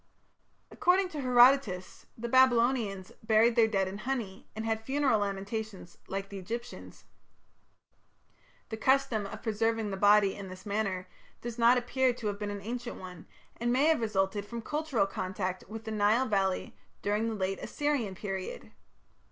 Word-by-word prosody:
According 365 +1 +2
to 300 -4 -5
Herodotus 245 -6 +3
the 235 +1 -4
Babylonians 235 -6 +3
"buried 225 +1 +4
their 230 -2 +5
dead 195 -3 0
in 195 +2 -6
honey, 225 -6 -4
and 220 0 -4
had 220 -1 -1
funeral 265 -2 +2
lamentations 200 -1 -4
like 195 +1 -4
the 200 - -7
Egyptians". 235 +6 -7 1.6
The 220 - -4
custom 230 -4 +2
of 215 +1 -9
preserving 225 -1 0
the 195 - -3
body 205 0 +5
in 195 -2 -8
this 185 +2 -11
manner 200 -3 -2 0.3
does 240 0 -6
not 235 +2 +6
appear 250 +1 +1
to 235 - -9
have 205 -1 -2
been 210 -1 -3
an 205 -1 -5
ancient 240 +2 -5
one, 180 -2 -10 0.3
and 240 +1 0
may 260 +4 +3
have 320 -7 +2
resulted 200 -2 0
from 230 +2 -7
cultural 295 -7 0
contact 185 -1 -4
with 225 +1 -7
the 220 - -5
Nile 215 +4 +3
valley 195 -5 0 0.3
during 210 +3 0
the 225 - -3
late 190 -1 -2
Assyrian 285 -10 -1
period. 190 -1 -5
220 Hz, 160 wpm, -30 LUFS, 195-240 Hz, 1.6 s, not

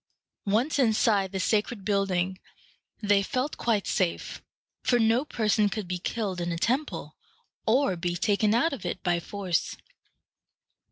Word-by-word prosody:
Once 240 +9 +1
inside 215 -5 +3
the 190 - -3
sacred 210 +1 0
building, 190 -2 0 0.6
they 205 -1 +4
felt 255 +8 -2
quite 220 -4 +1
safe; 180 -3 -1 0.4
for 245 - +3
no 230 +2 +3
person 215 -6 +1
could 210 -3 -4
be 180 0 -3
killed 195 -2 -3
in 175 0 -2
a 170 - -2
temple, 255 - -1 0.5
or 235 -3 +3
be 175 0 -2
taken 210 +3 +2
out 325 +7 +2
of 275 - -6
it 175 +1 -4
by 175 -2 +1
force. 185 0 -2
205 Hz, 145 wpm, -27 LUFS, 185-230 Hz, 0.6 s, they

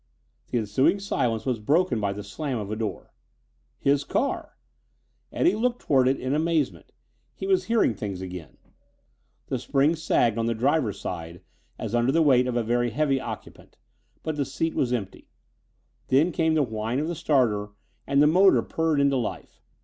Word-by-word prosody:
The - - -1
ensuing 115 - +2
silence 125 - -1
was 125 -4 -1
broken 145 - +1
by 100 -1 0
the 105 +1 -6
slam 130 +6 -4
of 105 -2 -5
a - - -1
door. 110 -4 -5 0.6
His 140 0 +2
car! 280 - -2 0.7
Eddie 350 - +2
looked 245 +2 0
toward 130 -3 +3
it 135 +1 +1
in 130 +2 -2
amazement; 155 -2 -1 0.4
he - - -6
was 385 -1 +2
hearing 230 - +2
things 100 -2 -5
again. 90 -6 -8 0.9
The - - -3
springs 150 +4 +1
sagged 115 -8 +2
on 115 - 0
the 115 - 0
driver's 130 -2 0
side 85 -1 -6 0.3
as 110 - -5
under 120 +2 +2
the 165 +3 +3
weight 130 -4 +4
of 125 - -2
a 120 - +1
very 120 +2 +1
heavy 135 +2 +1
occupant, 110 -4 -9 0.5
but 155 -1 -3
the 145 - +1
seat 160 +5 -2
was 125 - 0
empty. 105 -6 -4 0.8
Then 150 +7 +3
came 160 -1 +1
the 155 - +3
whine 110 0 -3
of 150 +3 -1
the 175 - -2
starter 120 -10 +1 0.4
and 140 +1 +4
the - - +6
motor 185 +5 +5
purred 160 -2 0
into 140 -1 +3
life. 120 - -5
130 Hz, 175 wpm, -25 LUFS, 110-155 Hz, 0.9 s, the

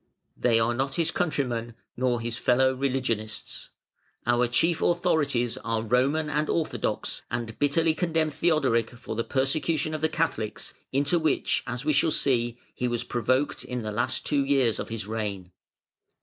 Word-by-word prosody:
They 115 -2 +3
are 115 +1 +2
not 135 +2 -1
his 165 -2 +1
countrymen, 120 -9 -1 0.2
nor 125 -1 +1
his 115 0 -2
fellow 130 +1 +3
religionists. 125 -5 -2 0.6
Our 120 0 +3
chief 160 +7 +2
authorities 145 -9 +1
are 115 0 -2
Roman 135 +7 +2
and 150 +1 0
Orthodox, 165 -2 -1
and 115 -2 -4
bitterly 155 +3 +3
condemn 160 -2 0
Theodoric 140 -9 +2
for 115 - -6
the 115 - 0
persecution 145 +4 0
of 155 - -3
the 160 - +2
Catholics, 135 -10 -2 0.2
into 145 +6 +2
which, 160 -1 +1
as 125 +3 -4
we 155 - +3
shall 145 +3 +3
see, 120 -5 +1 0.2
he 125 - -1
was 120 -1 -1
provoked 130 +4 0
in 125 -2 -4
the 105 - -3
last 125 +4 -1
two 140 -2 +2
years 135 -5 +2
of - - -4
his 115 -3 -4
reign. 100 -4 -4
130 Hz, 160 wpm, -27 LUFS, 115-150 Hz, 0.6 s, They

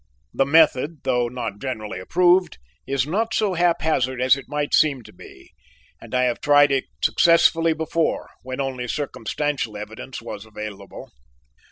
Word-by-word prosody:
The 135 - +1
method, 155 -1 +3
though 125 -1 +1
not 120 -4 -5
generally 110 -7 -5
approved, 180 - +2 0.3
is 135 -2 0
not 220 +8 -1
so 210 -3 +1
haphazard 160 -7 +1
as 130 +1 +4
it 140 - -9
might 145 0 -2
seem 140 -5 +3
to - - -15
be, 65 - -15 0.5
and - - -7
I 125 - +2
have 125 -1 -1
tried 145 -1 +5
it 135 -1 0 0.2
successfully 165 -1 +4
before 160 +1 -2
when 130 0 -7
only 130 -2 -3
circumstantial 145 -2 -3
evidence 110 +5 -8
was 105 -3 -8
available. 105 -2 -9
135 Hz, 150 wpm, -22 LUFS, 125-160 Hz, 0.5 s, tried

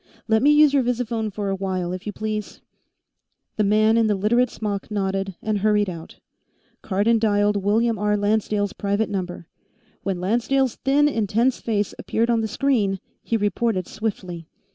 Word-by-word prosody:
Let 220 -1 +3
me 285 - +5
use 295 -1 +6
your 280 - +4
visiphone 235 -3 -1
for 200 0 -3
a 195 - 0
while, 185 -2 -2
if 185 +3 -7
you - - -2
please." 215 0 -4 1.0
The 215 - +2
man 215 +2 +3
in 225 -1 +3
the 210 - +2
Literate 235 +5 +2
smock 205 -3 -4
nodded 195 -2 -2
and 215 -2 0
hurried 210 -1 +2
out. 165 -1 -10 0.6
Cardon 215 +4 +1
dialed 205 -2 +2
William 220 +2 +1
R. 210 0 +1
Lancedale's 205 -1 0
private 200 +1 -1
number. 180 -3 -4 0.6
When 190 -2 -2
Lancedale's 240 +6 +1
thin, 285 +2 +3
intense 230 0 +1
face 210 -3 -1
appeared 230 +2 0
on 230 -1 +2
the 220 - -1
screen, 215 -5 0 0.2
he 230 - -1
reported 205 -1 0
swiftly. 185 -6 -5
210 Hz, 165 wpm, -23 LUFS, 200-230 Hz, 1.0 s, use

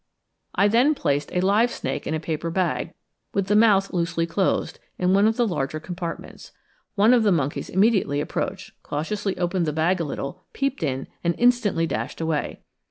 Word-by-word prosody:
I 200 - +4
then 245 +8 +4
placed 145 - -1
a 180 - 0
live 205 +6 +3
snake - - -4
in 160 - -1
a - - -2
paper 160 +1 -3
bag, 180 +1 -1 0.4
with 200 -1 +1
the 205 +2 +1
mouth 205 -3 +4
loosely 170 -1 0
closed, 185 +3 -1 0.2
in 180 +1 +2
one 200 +2 +5
of 225 - 0
the 240 - +3
larger 155 -5 -2
compartments. 170 0 -7 0.4
One 215 +4 +5
of 245 - +5
the 210 -2 +3
monkeys 145 -5 -1
immediately 190 -7 +2
approached, 150 - -3
cautiously 195 +7 -3
opened 175 -1 0
the 150 - -1
bag 170 +4 +1
a - - 0
little, 150 +4 -5
peeped 275 -4 -2
in, 135 -4 -2 0.2
and 170 -1 +1
instantly 240 -8 +3
dashed - - -4
away. 160 -2 -2
180 Hz, 180 wpm, -24 LUFS, 160-205 Hz, 0.4 s, one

